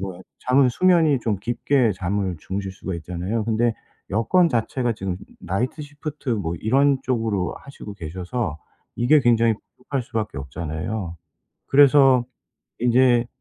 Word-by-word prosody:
뭐야 95 Hz, -2 st, -6 dB, 0.3 s
잠은 130 Hz, 0 st, +5 dB
수면이 165 Hz, -4 st, +3 dB
좀 110 Hz, -3 st, 0 dB
깊게 120 Hz, +1 st, +1 dB
잠을 95 Hz, -1 st, -2 dB
주무실 95 Hz, +1 st, -4 dB
수가 95 Hz, -1 st, -6 dB
있잖아요. 90 Hz, +7 st, -3 dB
근데 115 Hz, 0 st, +1 dB, 0.4 s
여건 170 Hz, -, +3 dB
자체가 120 Hz, 0 st, 0 dB
지금 95 Hz, -3 st, -4 dB, 0.2 s
나이트 120 Hz, -, -2 dB
시프트 145 Hz, -1 st, -6 dB
뭐 95 Hz, -8 st, -1 dB
이런 135 Hz, +4 st, +3 dB
쪽으로 115 Hz, -8 st, -1 dB
하시고 140 Hz, -6 st, -10 dB
계셔서 90 Hz, +1 st, -4 dB, 0.4 s
이게 140 Hz, +5 st, +4 dB
굉장히 115 Hz, -2 st, +3 dB, 0.2 s
부족할 135 Hz, +2 st, -3 dB
수밖에 110 Hz, -8 st, -4 dB
없잖아요. 80 Hz, +7 st, -5 dB, 0.5 s
그래서 135 Hz, -3 st, +6 dB, 0.5 s
인제 120 Hz, 0 st, +4 dB
115 Hz, 305 characters per minute, -23 LUFS, 95-130 Hz, 0.5 s, 그래서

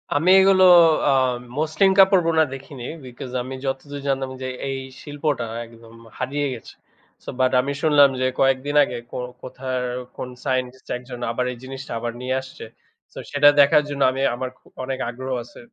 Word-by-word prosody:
আমি 160 Hz, +5 st, +2 dB
এগুলো 190 Hz, 0 st, +5 dB, 0.5 s
আ -, -, +5 dB, 0.5 s
মসলিন 160 Hz, +5 st, +2 dB
কাপড় 190 Hz, -1 st, +6 dB
বোনা 160 Hz, -1 st, +4 dB
দেখিনি। 135 Hz, -1 st, -9 dB, 0.2 s
because 125 Hz, 0 st, -9 dB
আমি 130 Hz, +2 st, -6 dB
যতদূর 140 Hz, +2 st, -4 dB
জানতাম 135 Hz, -1 st, -1 dB
যে, 130 Hz, -, -3 dB, 0.2 s
এই 135 Hz, -, -2 dB, 0.2 s
শিল্পটা 145 Hz, -3 st, -2 dB, 0.2 s
একদম 115 Hz, 0 st, -16 dB, 0.2 s
হারিয়ে 140 Hz, +3 st, -2 dB
গেছে। 115 Hz, -, -11 dB, 0.5 s
সো -, -, -8 dB
বাট 130 Hz, 0 st, +3 dB
আমি 140 Hz, +2 st, -3 dB
শুনলাম 145 Hz, -3 st, +6 dB
যে, -, -, +2 dB
কয়েকদিন 135 Hz, +2 st, +1 dB
আগে 125 Hz, -, -4 dB
কো -, -, -5 dB, 0.2 s
কোথার 130 Hz, 0 st, -4 dB, 0.3 s
কোন 125 Hz, -, -5 dB, 0.2 s
সাইন্টিস্ট 130 Hz, -1 st, -2 dB
১ 125 Hz, -, -6 dB
জন 125 Hz, -1 st, -7 dB
আবার 125 Hz, +2 st, -1 dB
এই 125 Hz, -, -9 dB
জিনিসটা 135 Hz, +1 st, -8 dB
আবার 120 Hz, 0 st, -3 dB
নিয়ে 130 Hz, +1 st, -1 dB
আসছে। 130 Hz, 0 st, -11 dB, 0.5 s
সো -, -, -15 dB
সেটা 145 Hz, 0 st, +6 dB
দেখার 145 Hz, +1 st, +6 dB
জন্য 140 Hz, -1 st, -5 dB
আমি 135 Hz, +1 st, -4 dB
আমার 130 Hz, +1 st, -4 dB, 0.3 s
অনেক 130 Hz, 0 st, -4 dB
আগ্রহ 130 Hz, +2 st, -6 dB
আছে 120 Hz, -, -15 dB
135 Hz, 170 wpm, -22 LUFS, 130-145 Hz, 0.5 s, কাপড়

